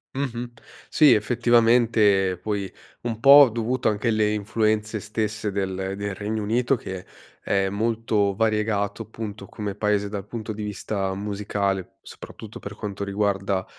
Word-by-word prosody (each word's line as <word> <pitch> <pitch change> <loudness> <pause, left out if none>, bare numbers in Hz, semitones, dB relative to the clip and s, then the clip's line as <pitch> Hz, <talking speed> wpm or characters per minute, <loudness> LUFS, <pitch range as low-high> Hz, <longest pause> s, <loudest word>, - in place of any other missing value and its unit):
Mh-mh. 125 -3 -3 0.4
Sì, 150 -5 +6
effettivamente 115 -5 +3
poi, 100 -3 -3 0.3
un 115 -2 -4
po' 140 +2 +9
dovuto 120 +2 0
anche 105 +2 -2
alle 110 -1 +2
influenze 110 +1 0
stesse 110 0 -3
del 95 -1 -2 0.2
del 100 -1 -4
Regno 105 +2 -3
Unito 120 +5 +1
che 95 -6 -7 0.4
è 95 -1 +1
molto 110 -1 0
variegato 105 -1 0
appunto 105 -2 -7
come 105 -1 -5
paese 105 -1 0
dal 100 -2 -5
punto 110 -1 -5
di 105 0 -6
vista 100 -1 -3
musicale, 100 -1 -3
soprattutto - - -11
per - - -8
quanto 100 -1 -5
riguarda 100 -1 -1
105 Hz, 135 wpm, -24 LUFS, 100-115 Hz, 0.4 s, po